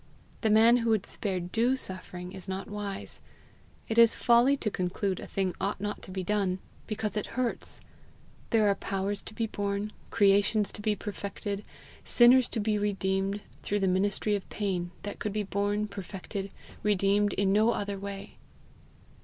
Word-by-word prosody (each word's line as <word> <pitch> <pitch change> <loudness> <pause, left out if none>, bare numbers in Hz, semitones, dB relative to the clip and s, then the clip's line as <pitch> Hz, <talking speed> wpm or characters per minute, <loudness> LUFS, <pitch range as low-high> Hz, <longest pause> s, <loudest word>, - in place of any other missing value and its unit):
The 220 - +2
man 225 +3 +7
who 230 -1 0
would 215 -3 +2
spare 190 -3 -3
DUE 230 +9 +1
suffering 185 -5 -6
is 190 0 -9
not 190 0 -4
wise. 205 -1 -6 0.7
It 225 +1 +2
is 230 -1 +7
folly 240 +4 +4
to 215 - -1
conclude 185 +1 -1
a - - -7
thing 190 -2 -1
ought 200 +1 -1
not 205 +1 -3
to - - -10
be 185 0 -3
done 195 -1 0 0.3
because 215 -1 -3
it 210 - -2
hurts. 250 -2 -1 0.7
There 220 -2 +4
are 200 - +5
powers 195 +1 -1
to 215 - -11
be 225 - 0
born, 205 0 -2 0.2
creations 205 0 +3
to - - -8
be 210 0 +1
perfected, 200 0 -5 0.4
sinners 245 +1 +6
to - - -2
be 210 0 +1
redeemed, 195 0 0 0.2
through 205 0 -1
the 190 - +2
ministry 200 +3 +1
of 200 - -5
pain, 185 -4 -2
that 205 - -6
could 210 - -2
be 210 0 0
born, 205 +1 0
perfected, 195 0 -6 0.3
redeemed, 205 0 +2
in 195 0 +2
no 215 +3 +4
other 200 -3 -3
way. 200 0 -7
205 Hz, 170 wpm, -29 LUFS, 195-215 Hz, 0.7 s, man